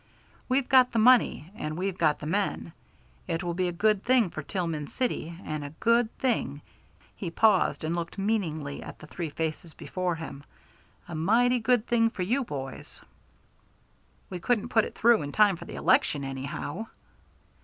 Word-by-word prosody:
We've 260 0 +2
got 255 -1 +5
the - - 0
money, 225 - +4
and 155 -7 -5
we've 190 0 -2
got 155 -5 +2
the - - -8
men. 185 -1 -1 0.5
It 165 +2 -2
will 175 -1 -2
be 180 +1 0
a - - -1
good 205 +3 +1
thing 245 -7 +3
for 155 - -5
Tillman 165 -3 -3
City, 170 - -3
and 155 -1 -4
a 145 +2 -8
good 235 0 +3
thing" 150 - -1 0.5
he 180 - -4
paused, 200 0 +3
and 160 +2 -1
looked 170 +2 -4
meaningly 170 -9 -2
at - - -9
the - - -12
three 165 +1 -5
faces 160 +2 -4
before 180 -2 -2
him 160 -3 -8 0.6
"a 175 - -8
mighty 235 +10 +3
good 240 0 +2
thing 230 -1 +3
for 195 -5 -4
you 245 +9 +1
boys." 135 - -7 1.3
"We 180 - -4
couldn't 235 +4 0
put 225 -3 +3
it - - -9
through 235 -1 +4
in 145 - -5
time 205 0 +4
for - - -10
the - - -8
election 145 -2 +2
anyhow." 140 +9 -5
180 Hz, 175 wpm, -28 LUFS, 155-225 Hz, 1.3 s, got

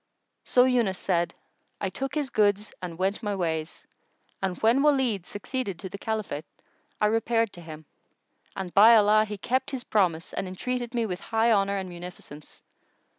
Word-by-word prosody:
So 250 - +5
Yunus 240 -7 +2
said, 170 -3 0 0.4
"I 195 - -2
took 270 +7 -4
his 290 -3 -1
goods 205 0 +1
and 175 -3 -6
went 190 +4 -1
my 205 -3 -2
ways; 160 -3 -3 0.6
and 190 -2 -2
when 235 +5 +4
Walid 260 - +2
succeeded 205 -2 -4
to 185 +3 -7
the 200 - -8
Caliphate, 210 -10 -3 0.5
I - - +3
repaired 225 0 +1
to 175 - -11
him; 155 -1 -10 0.7
and 190 -2 -5
by 220 +3 +8
Allah, 215 0 +5
he 210 -1 -6
kept 255 +7 -1
his 265 -3 -4
promise 180 -7 0
and 190 - -3
entreated 240 +6 -4
me 235 -1 +1
with 180 -4 -4
high 225 +2 +1
honour 200 -1 +2
and 190 -1 -4
munificence. 175 -4 -11
205 Hz, 170 wpm, -27 LUFS, 180-230 Hz, 0.7 s, by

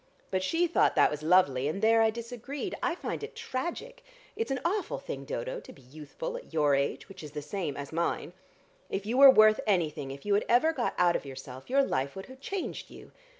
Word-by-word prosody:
But 190 -1 0
she 330 - +1
thought 340 - +2
that - - +5
was 150 0 -4
lovely, 155 -6 +3
and 155 +6 -2
there 225 +2 +4
I 225 - +5
disagreed. 245 - -6
I 345 - 0
find - - -5
it 445 +2 -7
tragic. 460 - -5 0.3
It's 455 +2 -2
an 270 -1 -1
awful 395 +4 -1
thing, - - -7
Dodo, - - -4
to - - -13
be 135 - -17
youthful 155 - -7
at - - -12
your 150 -3 +2
age, 140 0 -1
which 195 - -11
is 150 -1 -9
the 150 - -4
same 150 -2 -4
as 140 +2 -7
mine. 170 +1 -1 0.6
If 195 +1 -3
you 230 +4 -1
were 275 0 +11
worth 215 -4 +6
anything, 155 -8 0
if 140 +1 -9
you 205 - +1
had 205 - +2
ever 280 +8 +4
got 245 -6 -2
out 175 -1 +4
of - - -2
yourself, 135 - -10
your 275 +2 +4
life 135 - -2
would 195 - -7
have 260 0 -13
changed 385 +5 -5
you. - - -13
210 Hz, 225 wpm, -29 LUFS, -, 0.6 s, were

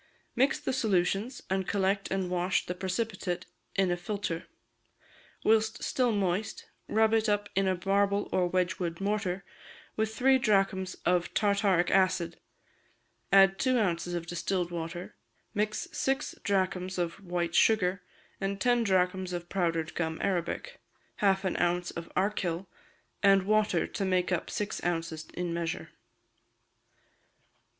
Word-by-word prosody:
Mix 265 +3 +3
the - - -2
solutions, 210 +1 0
and 190 0 -1
collect 195 0 0
and 190 -1 -1
wash 180 +1 +1
the 180 - -3
precipitate 185 -1 -3 0.3
in 190 -2 +2
a - - +2
filter; 175 -2 -4 1.0
whilst 220 0 +2
still 250 -2 +1
moist, 200 +1 -1 0.2
rub 220 +1 +3
it 220 0 +3
up 205 0 0
in 195 0 +2
a 185 -2 0
marble 200 +1 +2
or 180 -1 +2
Wedgwood 175 -2 -1
mortar 195 -2 -1 0.5
with 220 0 -1
three 265 +2 +4
drachms 195 -4 +1
of 175 0 +1
tartaric 200 -4 +2
acid; 185 -3 +2 0.9
add 195 0 +6
two 255 -1 +2
ounces 175 -5 0
of 170 -1 -3
distilled 175 +1 -2
water, 170 +1 -5 0.4
mix 210 +1 -1
six 270 0 -1
drachms 185 -1 0
of 175 +2 -3
white 175 -2 -2
sugar, 195 -3 +3 0.4
and 195 0 -2
ten 240 +2 +3
drachms 185 -2 +1
of 175 0 -5
powdered 165 -3 0
gum 160 -1 -2
arabic, 195 - -2 0.4
half 195 -1 +2
an 185 - 0
ounce 175 0 +1
of 170 0 -7
archil, 185 -2 0 0.6
and 195 -1 +5
water 215 +1 +2
to 200 - -4
make 185 -1 +1
up 175 - -1
six 210 0 -3
ounces 165 -2 -2
in 175 -1 -2
measure. 170 -1 -3
190 Hz, 135 wpm, -29 LUFS, 175-205 Hz, 1.0 s, add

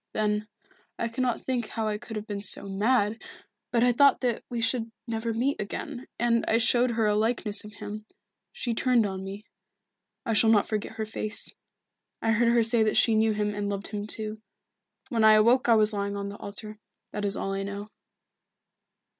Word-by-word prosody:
Then 210 0 0 0.5
I 235 - -1
cannot 245 +1 -2
think 245 -4 -1
how 220 -1 -3
I 210 -1 -2
could 230 -1 -9
have 210 0 -4
been 205 -2 -5
so 200 0 +1
mad 210 +2 +1 0.5
but 235 -1 +3
I 245 - +5
thought 280 +3 +4
that 245 -3 -1
we 240 -2 -3
should 230 0 0
never 230 -1 -2
meet 245 +4 0
again, 250 +5 -6
and 235 -1 +2
I 225 - +4
showed 240 +2 +4
her 225 -1 +1
a 210 - +3
likeness 215 -1 0
of 210 0 -11
him. 210 +1 -8 0.4
She 240 - -3
turned 240 -1 +2
on 190 -1 -4
me. 195 +2 -7 0.8
I 225 - 0
shall 220 +1 +5
not 210 -2 +4
forget 215 -1 -3
her 220 - -3
face. 215 0 -1 0.7
I 225 - +1
heard 230 +1 +3
her 235 -1 +4
say 225 +1 +3
that 215 -1 +2
she 230 - +4
knew 220 0 +3
him 210 0 -1
and 205 0 -3
loved 200 -1 -4
him 210 0 -4
too. 215 0 -6 0.7
When 230 -5 +1
I 220 0 +8
awoke 235 +4 +4
I 230 - +7
was 215 0 +4
lying 200 0 -2
on 200 0 -4
the 200 - -8
altar. 210 +1 -8 0.3
That 210 - -4
is 200 -1 0
all 195 - -2
I 195 - -2
know." 200 +1 -6
220 Hz, 200 wpm, -27 LUFS, 210-235 Hz, 0.8 s, I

